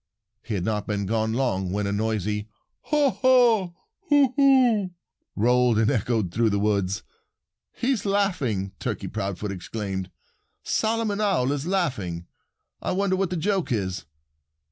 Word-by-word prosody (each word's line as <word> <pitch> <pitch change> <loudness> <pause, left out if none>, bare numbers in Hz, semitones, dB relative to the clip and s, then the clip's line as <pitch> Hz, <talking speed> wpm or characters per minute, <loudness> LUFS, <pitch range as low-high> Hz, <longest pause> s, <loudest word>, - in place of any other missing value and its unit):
He 110 - -4
had 90 - -2
not 105 -2 -2
been 100 -1 -1
gone 110 +2 0
long 105 -8 0
when 105 +1 -1
a 100 - -1
noisy 105 0 -1 0.4
"haw 295 -3 +2
haw 235 -9 +3 0.4
hoo 285 -4 +4
hoo" 255 -8 +4 0.5
rolled 120 +1 +3
and 110 +2 +3
echoed 110 -6 0
through 115 +4 +2
the 100 - 0
woods. 100 -2 0 0.7
"He's 250 -2 -1
laughing!" 165 - 0
Turkey - - -3
Proudfoot 100 +1 -4
exclaimed. 95 0 -5 0.5
"Solomon 220 -2 0
Owl 185 -11 +2
is 145 +2 -3
laughing. 105 - -1 0.6
I - - -1
wonder 195 0 +1
what 190 -1 0
the 180 - -2
joke 185 -4 0
is." 95 -5 -2
120 Hz, 140 wpm, -25 LUFS, -, 0.7 s, hoo